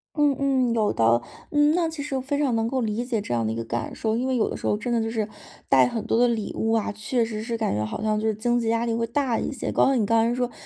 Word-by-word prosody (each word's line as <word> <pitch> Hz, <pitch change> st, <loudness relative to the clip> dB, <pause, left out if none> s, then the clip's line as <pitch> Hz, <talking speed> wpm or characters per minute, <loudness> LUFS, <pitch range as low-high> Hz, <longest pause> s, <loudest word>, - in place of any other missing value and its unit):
嗯 295 Hz, -2 st, +3 dB
嗯， 260 Hz, -4 st, +1 dB
有 215 Hz, -2 st, +2 dB
的。 115 Hz, +1 st, +3 dB, 0.3 s
嗯， 295 Hz, 0 st, +4 dB
那 340 Hz, -1 st, +1 dB
其 320 Hz, -3 st, -5 dB
实 275 Hz, -, -4 dB
我 -, -, -2 dB
非 285 Hz, +2 st, -2 dB
常 280 Hz, -5 st, +1 dB
能 225 Hz, 0 st, +1 dB
够 260 Hz, +1 st, -1 dB
理 225 Hz, +2 st, -2 dB
解 230 Hz, -4 st, -1 dB
这 120 Hz, -, -4 dB
样 115 Hz, -2 st, 0 dB
的 110 Hz, -, -1 dB
一 -, -, -5 dB
个 115 Hz, -, -3 dB
感 115 Hz, 0 st, -4 dB
受， 220 Hz, 0 st, -1 dB
因 255 Hz, +2 st, -1 dB
为 260 Hz, -, 0 dB
有 225 Hz, -, +1 dB
的 -, -, -4 dB
时 -, -, -4 dB
候 -, -, +2 dB
真 225 Hz, +3 st, -4 dB
的 230 Hz, -, +2 dB
就 225 Hz, -, -2 dB
是 220 Hz, -2 st, -1 dB, 0.4 s
带 130 Hz, -2 st, +6 dB
很 225 Hz, -, -4 dB
多 230 Hz, -, +1 dB
的 245 Hz, -, +5 dB
礼 225 Hz, -3 st, -2 dB
物 225 Hz, 0 st, 0 dB
啊， 220 Hz, -1 st, +1 dB
确 215 Hz, +4 st, -1 dB
实 215 Hz, -1 st, -4 dB
是 230 Hz, +1 st, -3 dB
感 220 Hz, -, -1 dB
觉 105 Hz, +1 st, -1 dB
好 110 Hz, -, -5 dB
像 215 Hz, -1 st, +1 dB
就 220 Hz, -, -1 dB
是 215 Hz, -, +1 dB
经 240 Hz, +3 st, +1 dB
济 230 Hz, -, -2 dB
压 230 Hz, +1 st, +1 dB
力 230 Hz, -, -1 dB
会 230 Hz, 0 st, -1 dB
大 255 Hz, -1 st, 0 dB
一 -, -, -3 dB
些， -, -, -4 dB
包括 270 Hz, 0 st, +3 dB
你 220 Hz, -4 st, +2 dB
刚 225 Hz, +1 st, +3 dB
才 240 Hz, -, 0 dB
说， 245 Hz, -1 st, -1 dB
230 Hz, 350 characters per minute, -24 LUFS, 215-255 Hz, 0.4 s, 带